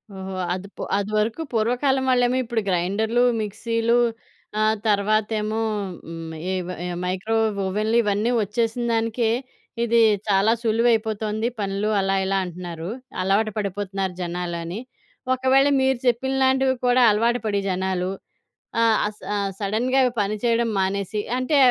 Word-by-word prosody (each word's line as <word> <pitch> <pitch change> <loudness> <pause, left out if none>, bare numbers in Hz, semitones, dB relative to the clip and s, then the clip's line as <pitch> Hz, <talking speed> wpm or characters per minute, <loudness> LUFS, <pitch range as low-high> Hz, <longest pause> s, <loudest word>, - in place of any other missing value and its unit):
ఓహో! 190 0 -6 0.2
అది 185 +2 -5
పు - - -7 0.2
అది 205 +1 -2
వరకు 220 +8 0
పూర్వకాలం 250 +4 +1
వాళ్ళేమో 250 0 +3
ఇప్పుడు 230 -1 -1
గ్రైండర్‌లు, 205 +7 +1 0.2
మిక్సీలు 230 +2 0 0.6
ఆహ్, 215 0 +3
తర్వాతేమో 215 +1 +1 0.5
హ్మ్ 165 -1 -7 0.2
ఈ - - 0 0.3
ఈ - - -3 0.2
మైక్రో 190 +5 -1 0.3
ఓవెన్‌లు 215 +4 0
ఇవన్నీ 210 +3 +1
ఒచ్చేసినదానికే, 230 +1 0 0.5
ఇది 235 0 +3 0.3
చాలా 200 +2 +4
సులువయిపోతుంది. 220 -1 +1
పనులు 200 +1 -1
అలా 195 0 +1
ఇలా 195 0 +1
అంటున్నారు. 175 -1 -7 0.3
అలవాటు 200 +4 +2
పడిపోతున్నారు 195 -2 -2
జనాలు 175 0 -3
అని. 175 +6 -5 0.5
ఒకవేళ 265 +2 +3
మీరు 265 -1 +2
చెప్పినలాంటివి 265 +2 +2
కూడా 250 +1 +4
అలవాటు 230 +4 +2
పడి 205 -2 +1
జనాలు, 185 0 -1 0.7
ఆ! - - +4 0.2
ఆహ్, 210 - -4
స - - -26 0.4
సడెన్‌గా 240 +6 +1 0.2
పని 205 +1 0
చేయడం 235 0 +2
మానేసి, 200 +2 -1 0.2
అంటే 255 +4 +1
215 Hz, 125 wpm, -23 LUFS, 195-235 Hz, 0.7 s, చాలా